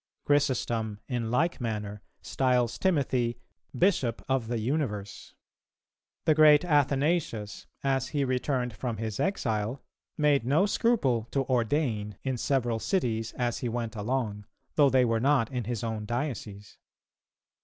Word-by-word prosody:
Chrysostom, 120 -7 +1
in 120 -4 -2
like 155 +6 +1
manner, 105 -3 -4 0.2
styles 125 -3 +1
Timothy, 130 -9 +1 0.4
Bishop 150 - +1
of 130 -4 0
the 120 0 -1
universe..... 110 -5 -3 0.9
The 155 - +5
great 155 +1 +6
Athanasius, 145 - 0 0.2
as 135 -2 +1
he 145 -2 -1
returned 125 -1 -1
from 115 0 -3
his 110 -1 -4
exile, 115 - -1 0.3
made 145 -4 +3
no 145 +10 +3
scruple 145 - +1
to 135 +1 0
ordain 115 - 0
in 130 -2 -1
several 120 -4 0
cities 115 - -1
as 120 -2 -1
he 120 - -2
went 115 -1 -3
along, 105 -2 -2 0.3
though 145 -2 +5
they 130 -1 +4
were 115 -1 +1
not 135 -2 +2
in 125 -3 -3
his 120 -1 -3
own 110 -2 -3
diocese. 115 -6 -5
125 Hz, 135 wpm, -28 LUFS, 110-140 Hz, 0.9 s, great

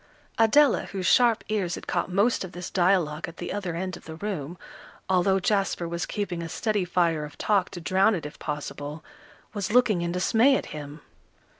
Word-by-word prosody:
Adela, 260 +4 +5
whose 190 -2 -5
sharp 235 0 +4
ears 195 -5 -1
had - - -9
caught 175 0 -1
most 200 +6 +2
of 185 - -8
this 180 +1 -7
dialogue 175 -4 +1
at 170 - -11
the 175 - -5
other 190 -5 -3
end 185 +1 -3
of - - -14
the 160 - -8
room, 175 -3 -5 0.5
although 190 +1 +3
Jasper 195 -3 0
was 170 +1 -3
keeping 195 -5 -3
a 165 - -5
steady 210 +1 -1
fire 170 -3 +1
of 150 -1 -9
talk 200 -4 +1
to 175 - -8
drown 190 +5 +3
it 165 - -5
if 150 - -9
possible, 150 0 -5 0.5
was 205 -1 -3
looking 225 -6 +4
in 170 0 -1
dismay 225 +9 +3
at - - -2
him. 150 0 -8
180 Hz, 190 wpm, -26 LUFS, 170-205 Hz, 0.5 s, Adela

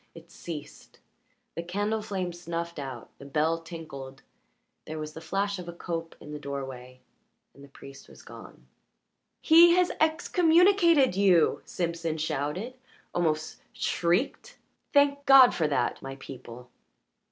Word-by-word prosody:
It 165 0 -14
ceased; 155 -3 -9 0.6
the 170 - -4
candle 205 +5 -2
flame 190 -4 -4
snuffed 170 -1 -5
out, 130 -4 -7
the 140 - -11
bell 155 +3 0
tinkled, 140 -6 -9 0.6
there 155 - -6
was 155 0 -6
the 160 - -9
flash 195 +4 -2
of 175 -1 -8
a - - -7
cope 165 -1 -5
in 150 - -11
the 150 - -6
doorway, 130 -3 -7 0.5
and 140 - -16
the - - -13
priest 140 0 -14
was - - -16
gone. - - -13 0.8
"He 340 +1 +7
has 360 -1 +2
excommunicated 335 - +4
you!" 190 -5 +3
Simpson 165 -2 -3
shouted, 155 - -3 0.4
almost 155 -3 -1
shrieked. 175 +9 -1 0.3
"Thank 285 0 +3
God 265 -2 +8
for 160 - 0
that, 145 - -1
my 135 0 -7
people!" 125 -2 -11
170 Hz, 135 wpm, -27 LUFS, 145-205 Hz, 0.8 s, God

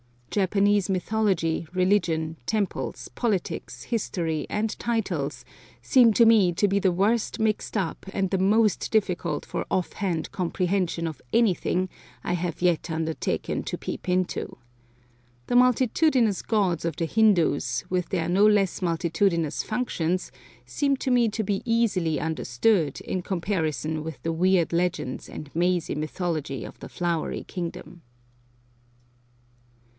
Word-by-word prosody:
Japanese 200 0 +2
mythology, 185 -4 0
religion, 175 -4 +1
temples, 215 -3 -2
politics, 210 -7 -2
history, 170 - -2
and 215 +1 -2
titles, 185 -11 -2 0.4
seem 245 -4 +5
to 235 - +5
me 210 -6 +5
to 195 +4 +2
be 200 +1 +2
the 190 -2 +2
worst 205 +6 +1
mixed 220 0 -1
up 190 -6 -2
and 195 -2 0
the 190 - +2
most 210 +2 +2
difficult 180 -8 0
for - - -4
off 185 - -1
hand 180 -6 -2
comprehension 180 -1 -1
of 160 -2 -5
anything 185 -4 +2 0.4
I - - -1
have 175 -1 -3
yet 175 -1 +2
undertaken 160 0 -2
to - - -4
peep - - -6
into. 180 0 -1 0.9
The - - 0
multitudinous 250 - +3
gods 195 -7 0
of 165 -3 -1
the 165 - -1
Hindoos, 165 - +2
with 180 -1 -1
their 170 -3 -1
no 195 +4 +5
less 200 -3 +2
multitudinous 170 -1 0
functions, 185 -7 -2 0.3
seem 275 - 0
to 260 - -2
me 245 -2 +4
to 220 +1 -2
be 200 -1 -1
easily 200 -10 +1
understood 160 - 0
in 185 - -3
comparison 160 - -2
with 160 +1 -7
the 165 - 0
weird 175 0 +2
legends 170 -7 -1
and 145 -2 -9
mazy 175 0 +1
mythology 155 -4 -3
of - - -10
the - - -9
Flowery 170 -2 -2
Kingdom. 175 0 -7
185 Hz, 130 wpm, -26 LUFS, 165-210 Hz, 0.9 s, seem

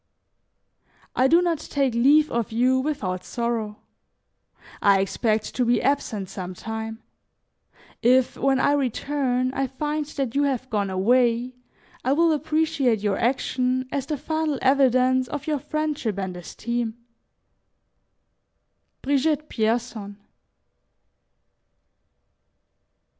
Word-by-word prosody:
"I 255 - +4
do 335 +5 +5
not 335 -3 0
take 275 -4 -1
leave 290 +6 +4
of 235 -2 -1
you 250 +3 +2
without 210 -11 -2
sorrow; 230 -3 -3 1.0
I 200 -1 +5
expect 215 +3 -1
to 255 - 0
be 240 -1 +3
absent 235 -8 -1
some 185 -1 -7
time; 220 +2 -6 1.0
if, 255 +1 +3
when 270 0 +1
I 285 - +3
return, 260 -1 0
I 270 0 -1
find 295 +3 -3
that 275 -5 -3
you 280 - +2
have 260 -3 -1
gone 205 -2 0
away, 240 +5 +2 0.5
I 260 - +2
will 330 +2 +3
appreciate 305 -6 +1
your 205 -2 0
action 255 +1 0
as 275 -1 -2
the 300 - -2
final 315 0 -1
evidence 260 -1 +3
of 290 +1 -5
your 305 -3 -1
friendship 295 -8 -2
and 190 -2 -3
esteem. 235 +6 -4 2.1
"BRIGITTE 290 +2 +1
PIERSON." 220 -3 -2
255 Hz, 110 wpm, -24 LUFS, 225-285 Hz, 2.1 s, do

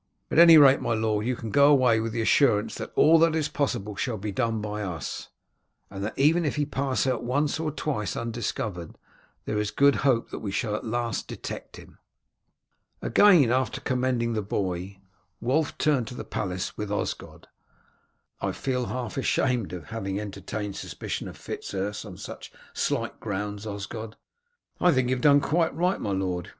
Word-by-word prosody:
At - - +3
any 170 -1 +10
rate, 140 -2 +7
my 115 - 0
lord, 110 0 0
you 125 - 0
can 115 -2 -6
go 140 +5 +6
away 125 -5 +4
with 115 0 -2
the 115 0 -1
assurance 110 -4 +3
that - - -6
all 165 +1 +6
that 165 -1 +4
is 155 -2 +1
possible 120 -9 -2
shall 115 +1 -2
be 105 +1 -4
done 115 +1 -1
by 105 0 -4
us, 85 -8 -5 0.6
and 100 0 -6
that 110 - -4
even 160 +5 +4
if 150 - -1
he 150 -1 0
pass 135 -2 -1
out 130 -3 0
once 145 +6 0
or 160 -1 -1
twice 140 -8 -3
undiscovered 110 -6 -4 0.5
there 105 - -1
is 105 -1 -1
good 140 +3 +4
hope 130 -4 +1
that - - -5
we 105 - -4
shall 105 +2 -1
at - - -4
last 120 0 -2
detect - - -7
him." - - -15 1.0
After - - -4
again 130 - +5 0.2
commending 125 -2 0
the 110 - -1
boy, 95 -1 -3 0.4
Wulf 140 +7 +1
returned 140 -7 +1
to 125 - -7
the - - -6
palace 90 -2 -3
with 105 -1 -4
Osgod. 105 - -4 0.9
"I - - -1
feel 125 -2 -2
half 125 -1 -4
ashamed 125 -5 0
of 90 +1 -8
having 100 -3 -3
entertained 105 0 -5
a - - -9
suspicion - - -5
of - - -9
Fitz - - -7
Urse 100 +2 -3
on - - -9
such - - -9 0.2
slight - - -2
grounds, 105 0 -4
Osgod." 110 +2 -6 0.6
"I 180 - +5
think 130 -2 +1
you 130 - +2
have 125 - -5
done 145 0 +6
quite 165 +1 +1
right, 180 +4 0
my - - -2
lord. 95 -2 -2
115 Hz, 185 wpm, -26 LUFS, 105-140 Hz, 1.0 s, any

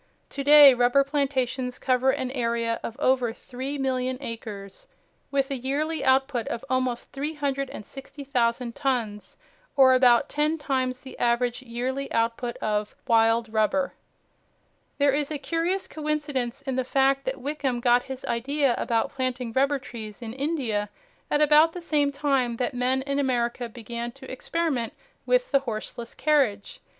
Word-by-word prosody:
To 280 - -4
day 290 -1 +9
rubber 245 +3 +4
plantations 260 -3 -1
cover 255 0 +2
an 260 -2 -1
area 230 -2 -1
of 230 - -7
over 255 -3 +2
3,000,000 260 0 -3
acres, 220 - -7 0.4
with 275 0 0
a - - 0
yearly 285 +5 -2
output 265 -3 +2
of 235 +3 -4
almost 255 -2 -1
360,000 275 -3 -3
tons, 230 -7 -2 0.4
or 265 -2 +7
about 250 -2 +5
ten 300 +2 0
times 260 -4 -2
the 265 - -11
average 240 +1 +1
yearly 260 +3 -4
output 230 +1 -1
of 210 -1 -2
"wild 225 -1 +3
rubber." 245 +6 +1 1.0
There 280 -1 +3
is 290 0 0
a 305 - -2
curious 335 +6 -1
coincidence 290 -4 -3
in 265 -2 -3
the 260 - +1
fact 270 +1 +2
that 260 +1 -3
Wickham 270 -2 -2
got 245 0 +4
his 265 0 -7
idea 275 +3 +1
about 230 -2 0
planting 255 -3 -3
rubber 275 +3 +2
trees 220 -5 -9
in 230 -2 -6
India 260 -8 -1 0.4
at 295 - +2
about 305 +2 +6
the 360 - -6
same 300 -4 +1
time 275 -4 0
that 250 +1 -1
men 255 +2 +1
in 280 +1 -1
America 240 -2 -1
began 235 +1 -6
to 270 -1 -11
experiment 265 -3 -2 0.3
with - - +2
the 275 - +5
horseless 235 -1 -6
carriage. 255 -9 +1
260 Hz, 145 wpm, -26 LUFS, 240-280 Hz, 1.0 s, day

